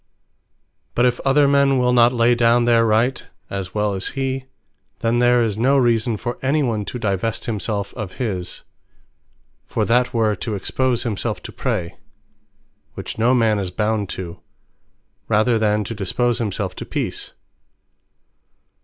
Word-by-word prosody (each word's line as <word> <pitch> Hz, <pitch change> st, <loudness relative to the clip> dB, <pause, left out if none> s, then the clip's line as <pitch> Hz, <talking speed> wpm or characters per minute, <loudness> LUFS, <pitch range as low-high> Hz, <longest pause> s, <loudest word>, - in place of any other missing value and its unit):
But 120 Hz, -, +3 dB
if 125 Hz, 0 st, +1 dB
other 140 Hz, +1 st, +3 dB
men 140 Hz, -1 st, +3 dB
will 125 Hz, 0 st, +2 dB
not 120 Hz, 0 st, +5 dB
lay 120 Hz, -1 st, +3 dB
down 120 Hz, 0 st, +3 dB
their 115 Hz, -1 st, +4 dB
Right, 115 Hz, +4 st, +1 dB, 0.3 s
as 95 Hz, -1 st, -5 dB
well 105 Hz, -1 st, +1 dB
as 95 Hz, -, -3 dB
he; 135 Hz, -1 st, -2 dB, 0.6 s
then 115 Hz, +1 st, +1 dB
there 120 Hz, 0 st, +4 dB
is 110 Hz, -2 st, -2 dB
no 135 Hz, +4 st, +3 dB
Reason 115 Hz, -3 st, +2 dB
for 120 Hz, +3 st, -5 dB
any 145 Hz, +3 st, +1 dB
one, 110 Hz, -5 st, -1 dB
to 125 Hz, -, -5 dB
devest 110 Hz, 0 st, -2 dB
himselfe 105 Hz, -2 st, -3 dB
of 105 Hz, -6 st, -6 dB
his: 95 Hz, -8 st, -4 dB, 1.0 s
For -, -, -1 dB
that 125 Hz, +1 st, +2 dB
were 110 Hz, -3 st, +1 dB
to 110 Hz, +2 st, -3 dB
expose 125 Hz, +5 st, 0 dB
himselfe 110 Hz, -1 st, -3 dB
to -, -, -7 dB
Prey, 105 Hz, -10 st, -3 dB, 1.0 s
(which -, -, -7 dB
no 120 Hz, +3 st, +4 dB
man 110 Hz, -3 st, +2 dB
is 95 Hz, -2 st, -3 dB
bound 105 Hz, +1 st, -1 dB
to) 85 Hz, -2 st, -7 dB, 0.9 s
rather 110 Hz, +2 st, +2 dB
than 105 Hz, -1 st, +1 dB
to 110 Hz, -, -5 dB
dispose 120 Hz, +4 st, 0 dB
himselfe 100 Hz, -4 st, -2 dB
to -, -, -6 dB
Peace. -, -, -4 dB
115 Hz, 155 wpm, -21 LUFS, 105-125 Hz, 1.0 s, not